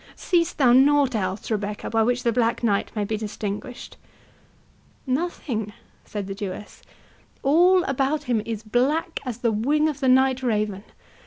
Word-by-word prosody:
—seest 345 Hz, -2 st, 0 dB
thou 255 Hz, -4 st, +5 dB
nought 275 Hz, 0 st, +4 dB
else, 195 Hz, 0 st, -3 dB
Rebecca, 210 Hz, -1 st, -3 dB
by 225 Hz, 0 st, +1 dB
which 245 Hz, +2 st, +1 dB
the 235 Hz, -, +2 dB
Black 230 Hz, 0 st, 0 dB
Knight 205 Hz, -4 st, +1 dB
may 210 Hz, -, 0 dB
be 215 Hz, +2 st, -2 dB
distinguished?" 210 Hz, +2 st, -6 dB, 1.1 s
"Nothing," 255 Hz, -, -2 dB, 0.3 s
said 205 Hz, -2 st, -5 dB
the 195 Hz, -, -5 dB
Jewess; 200 Hz, 0 st, -7 dB, 0.6 s
"all 355 Hz, +6 st, +5 dB
about 275 Hz, +2 st, -1 dB
him 240 Hz, -5 st, 0 dB
is 225 Hz, -1 st, -5 dB
black 270 Hz, -, 0 dB
as 245 Hz, -4 st, -4 dB
the 240 Hz, -2 st, 0 dB
wing 285 Hz, +9 st, +1 dB
of 295 Hz, -3 st, -3 dB
the 265 Hz, -2 st, +1 dB
night 260 Hz, 0 st, +4 dB
raven. 210 Hz, -5 st, -1 dB
245 Hz, 155 wpm, -24 LUFS, 215-275 Hz, 1.1 s, thou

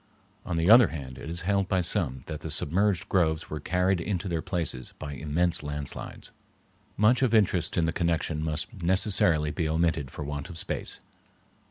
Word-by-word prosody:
On 90 Hz, -, -2 dB
the 80 Hz, +1 st, +1 dB
other 115 Hz, +3 st, +8 dB
hand, 65 Hz, -5 st, -7 dB
it -, -, -7 dB
is 85 Hz, +1 st, -3 dB
held 100 Hz, +1 st, +1 dB
by 95 Hz, -1 st, +1 dB
some 65 Hz, -6 st, 0 dB
that 75 Hz, -2 st, -6 dB
the -, -, -6 dB
submerged 95 Hz, +2 st, +1 dB
groves 80 Hz, -4 st, 0 dB
were 75 Hz, -, -3 dB
carried 90 Hz, +3 st, +1 dB
into 95 Hz, 0 st, -2 dB
their 85 Hz, -3 st, -1 dB
places 80 Hz, -9 st, -2 dB
by 75 Hz, -2 st, -6 dB
immense 80 Hz, +5 st, 0 dB
landslides. 75 Hz, -1 st, -6 dB, 0.7 s
Much 110 Hz, +5 st, +4 dB
of 120 Hz, -4 st, +3 dB
interest 95 Hz, -6 st, +2 dB
in 85 Hz, -, +3 dB
the 80 Hz, -, -1 dB
connection 85 Hz, -3 st, -1 dB
must 80 Hz, +7 st, -3 dB
necessarily 85 Hz, -4 st, +2 dB
be 80 Hz, -1 st, -2 dB
omitted 80 Hz, -3 st, 0 dB
for 75 Hz, -, -7 dB
want 75 Hz, +3 st, -5 dB
of 85 Hz, -, -8 dB
space. -, -, -1 dB
85 Hz, 180 wpm, -27 LUFS, 75-95 Hz, 0.7 s, other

